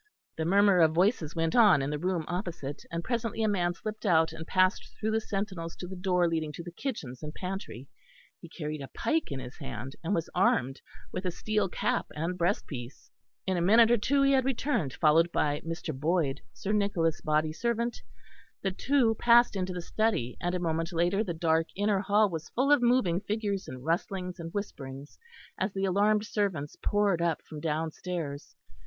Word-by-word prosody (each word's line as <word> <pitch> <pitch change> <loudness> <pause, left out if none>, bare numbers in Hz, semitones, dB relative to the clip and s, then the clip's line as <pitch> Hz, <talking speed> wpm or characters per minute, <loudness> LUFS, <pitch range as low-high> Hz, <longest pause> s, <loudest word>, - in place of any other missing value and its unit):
The 160 - -2
murmur 200 +1 +5
of 160 -2 +5
voices 175 -3 +1
went 165 -1 0
on 205 - +6
in 140 - -2
the 150 - -2
room 180 -1 -1
opposite; 175 -6 -4
and 170 0 -3
presently 230 -1 -2
a - - +3
man 175 -4 +1
slipped 215 +4 -6
out 165 -6 +3
and 160 0 -8
passed 185 0 +2
through 220 0 -1
the 220 0 +1
sentinels 195 -6 -4
to - - -7
the 190 - -7
door 180 -1 +2
leading 160 -2 -1
to 170 - -7
the 175 - -8
kitchens 165 - -5
and 150 - -5
pantry; 180 - -6 0.5
he 170 - -12
carried 155 -3 -5
a 135 - -6
pike 320 - 0
in 135 - -3
his 125 +2 -9
hand, 135 -2 -6
and 185 +5 0
was 165 - -1
armed 135 -7 +2 0.3
with 185 - -4
a 185 - 0
steel 210 +2 -1
cap - - -1
and 165 +4 -2
breast 175 0 0
piece. 125 -2 -9 0.3
In 190 -1 0
a - - 0
minute 225 +4 +5
he 275 0 +3
had 265 -1 +4
returned 245 - 0
followed 165 +2 +4
by 145 -2 0
Mr. 165 -1 -4
Boyd, 150 -1 0
Sir 115 - -4
Nicholas' 200 -6 +1
body 155 0 +1
servant; 235 +5 -1 0.6
the 195 - +1
two 245 +3 +2
passed 240 0 +5
into 185 -1 -2
the 180 -1 -5
study 200 - 0
and 175 +1 -1
a - - -1
moment 165 0 -1
later 175 +5 +1
the 175 -6 -4
dark 160 0 +2
inner 205 0 +1
hall 205 +2 +3
was 165 -4 -6
full 270 +4 +1
of 290 -3 +6
moving 240 -8 +3
figures 205 -2 -2
and 130 +1 -8
rustlings 180 +2 -2
and 165 0 -6
whisperings, 140 -8 -6 0.4
as 190 +2 0
the 195 0 -1
alarmed 205 +3 +2
servants 190 -10 -2
poured 205 -4 +2
up 170 -2 0
from 155 - -9
downstairs. 160 -1 -4
180 Hz, 190 wpm, -29 LUFS, 160-205 Hz, 0.6 s, on